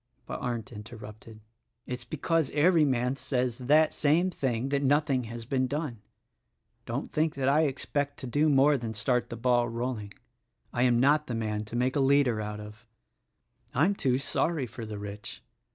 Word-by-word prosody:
But - - -5
Arndt 120 +1 -3
interrupted: 110 0 -11 0.4
"It's 125 -1 -5
because 160 +4 0
every 160 +1 +5
man 125 -1 +1
says 125 -3 -1
that 150 +5 +4
same 165 +5 +2
thing 130 -5 -1
that 140 0 +1
nothing 140 -2 +2
has 115 0 -7
been 130 +1 0
done. 140 -6 -4 0.9
Don't - - -4
think 155 0 0
that 135 -1 -1
I 150 +3 +4
expect 145 +1 -2
to - - -5
do 145 +5 +2
more 140 0 +4
than 115 -2 -5
start 125 +3 0
the 115 - -6
ball 120 0 +2
rolling. 115 -3 -4 0.6
I 120 - 0
am 120 -1 +3
not 150 +4 +3
the 120 - -3
man 110 -1 -2
to 110 - -8
make 125 +2 +1
a - - +2
leader 135 -5 +3
out 105 0 -5
of: 105 +2 -11 0.9
I'm 160 +10 +3
too 130 -9 +1
sorry 145 +1 0
for 115 -1 -8
the 105 -1 -6
rich. 100 0 -7
125 Hz, 175 wpm, -28 LUFS, 115-145 Hz, 0.9 s, every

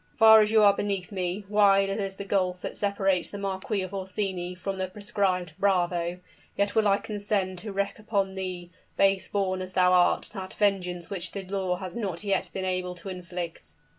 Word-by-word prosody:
"Far 220 -1 +9
as 210 - +2
you 220 -1 +5
are 200 -1 +7
beneath 200 -1 -2
me 185 +1 -3
wide 200 -1 +4
as 195 +2 -2
is 195 -1 -2
the 200 - -7
gulf 185 -2 0
that - - -4
separates 195 -3 0
the 205 - -7
Marquis 195 +1 -2
of 185 - -7
Orsini 190 -2 -3
from 190 +1 -4
the 190 - -1
proscribed 185 -3 -1
bravo 175 -2 +1 0.4
yet 200 0 +1
will 220 -2 +3
I 200 0 +4
condescend 200 -3 -2
to 210 +2 -6
wreak 200 +1 -2
upon 200 -3 -1
thee, 185 -2 -5 0.3
base 195 -1 +3
born 190 -2 -1
as 185 0 -6
thou 180 0 +4
art, 180 -1 +3
that 190 -2 -6
vengeance 180 -4 0
which 190 -3 -3
the 195 - -4
law 190 -1 -1
has 185 0 -7
not 195 -6 -3
yet 195 -2 0
been 190 -1 -3
able 185 -1 -1
to 185 +2 -9
inflict." 175 -2 -7
190 Hz, 195 wpm, -27 LUFS, 180-200 Hz, 0.4 s, Far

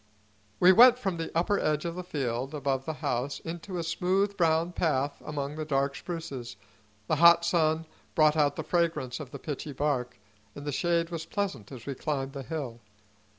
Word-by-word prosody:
We 180 - +8
went 245 +5 +8
from 195 -8 -2
the 165 - -3
upper 200 +4 +2
edge 155 +1 0
of 170 - -2
the 180 +1 -5
field 135 -3 -3
above 135 -2 -1
the 160 - -2
house 135 +1 -1
into 175 +3 -6
a 170 - -2
smooth, 185 +4 0
brown 165 -1 +2
path 145 -5 0
among 145 -1 -4
the 155 - -2
dark 140 -2 0
spruces. 140 -9 -6 0.5
The 155 - 0
hot 170 +1 +7
sun 160 -2 +2 0.3
brought 155 0 +5
out 145 -2 +2
the - - -4
fragrance 165 -7 0
of 145 -4 -7
the - - -7
pitchy 145 -1 -5
bark, 130 -3 -1 0.4
and 145 - -8
the 145 - -2
shade 170 +3 0
was 165 -1 -5
pleasant 195 - -3
as 125 -4 -9
we 140 - -3
climbed 135 0 -3
the 140 - -5
hill. 135 -4 -5
155 Hz, 190 wpm, -28 LUFS, 140-170 Hz, 0.5 s, We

